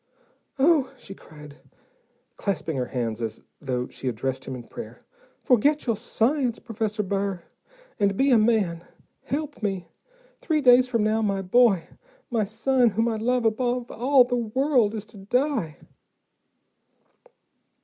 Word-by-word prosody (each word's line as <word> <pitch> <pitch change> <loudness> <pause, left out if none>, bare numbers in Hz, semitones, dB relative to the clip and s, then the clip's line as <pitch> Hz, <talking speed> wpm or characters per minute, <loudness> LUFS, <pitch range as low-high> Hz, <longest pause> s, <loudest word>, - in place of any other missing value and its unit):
"Oh," 280 -1 +3
she 215 -5 -10
cried, 150 -5 -14 0.8
clasping 170 -6 -2
her 125 -2 -2
hands 120 -3 -3
as 110 -1 -5 0.2
though 125 -3 -2
she 130 - -7
addressed 130 +2 -3
him 130 - -5
in 125 - -8
prayer, 235 - -10 0.4
"forget 285 +5 +3
your 230 -3 +1
science, 245 +3 0
Professor 220 -2 -3
Burr, 195 -2 -2 0.6
and 200 -1 +1
be 275 +1 +3
a 235 - +6
man. 210 -7 +1 0.4
Help 295 0 -4
me. 195 -4 -3 0.5
Three 315 -3 +1
days 250 -2 +6
from 230 -4 0
now 215 +1 +1
my 195 -2 -1
boy, 200 -2 +4 0.5
my 225 -3 +1
son, 240 +4 +2
whom 225 +3 0
I 225 -2 -1
love 245 +2 0
above 240 +2 0
all 260 +2 +4
the 245 0 -2
world, 240 -1 +1
is 215 -1 -5
to 220 -1 -15
die." 225 - -1
220 Hz, 140 wpm, -25 LUFS, 190-250 Hz, 0.8 s, a